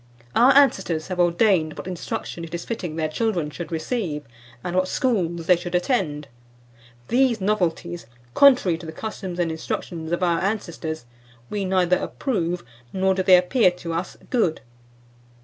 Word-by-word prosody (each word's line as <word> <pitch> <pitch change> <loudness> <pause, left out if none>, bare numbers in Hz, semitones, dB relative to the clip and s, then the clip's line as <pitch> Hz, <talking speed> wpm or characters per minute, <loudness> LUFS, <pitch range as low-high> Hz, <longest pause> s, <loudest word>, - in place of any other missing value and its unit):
Our 245 +3 +6
ancestors 195 - +3
have 180 -1 -4
ordained 175 -2 +3
what - - -7
instruction 175 -1 -5
it 165 +1 -6
is 170 - -5
fitting 180 -9 -4
their 160 -1 0
children 170 -3 -1
should 175 +3 -7
receive, 160 - -2 0.4
and 175 - -3
what 185 0 +2
schools 175 -11 0
they 180 - +6
should 175 +1 -5
attend. 175 - 0 0.8
These 245 -2 +3
novelties, 175 - -1 0.3
contrary 250 -12 +5
to 165 - -9
the - - -5
customs 190 -3 -6
and 170 -2 0
instructions 160 0 -4
of 175 +1 0
our 170 -2 +2
ancestors, 170 - -3 0.5
we 205 -2 -1
neither 180 -1 +2
approve, 180 - -2 0.3
nor 190 0 +2
do 190 - 0
they 185 -1 +7
appear 185 +4 +4
to 175 -2 -6
us 170 +2 -4
good. 220 -11 +1
180 Hz, 155 wpm, -23 LUFS, 165-200 Hz, 0.8 s, they